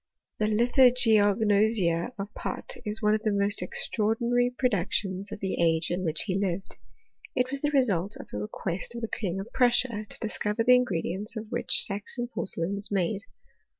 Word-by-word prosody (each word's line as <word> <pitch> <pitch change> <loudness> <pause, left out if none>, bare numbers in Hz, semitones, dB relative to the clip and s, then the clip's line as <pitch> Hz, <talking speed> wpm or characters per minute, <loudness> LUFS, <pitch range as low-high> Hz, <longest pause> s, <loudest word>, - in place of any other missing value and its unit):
The 215 - +1
Lithogeognosia 220 -4 +3
of 200 +1 -6
Pott - - -4
is 215 0 -4
one 210 0 +4
of 215 - 0
the 215 -1 0
most 200 0 +3
extraordinary 235 +6 +1
productions 200 -5 -1
of - - -7
the 190 -2 -2
age 165 0 +2
in 180 +1 -2
which 160 -2 +1
he 195 -2 -1
lived. 190 -1 -3 0.6
It 255 +1 0
was 275 0 -4
the 295 - +1
result 210 - +1
of - - -10
a 105 - -3
re 105 - -4
quest 195 +6 -4
of 235 - -5
the 225 - -2
King 195 -4 -3
of 215 +6 -8
Prussia, 240 -3 +2
to - - -4
discover 215 0 -1
the 250 +2 +6
ingredients 215 -4 0
of 220 0 -7
which 240 - +4
Saxon 215 +4 -3
porcelain 175 -4 -1
was 200 +1 +1
made. 195 +1 -1
210 Hz, 180 wpm, -27 LUFS, 195-235 Hz, 0.6 s, the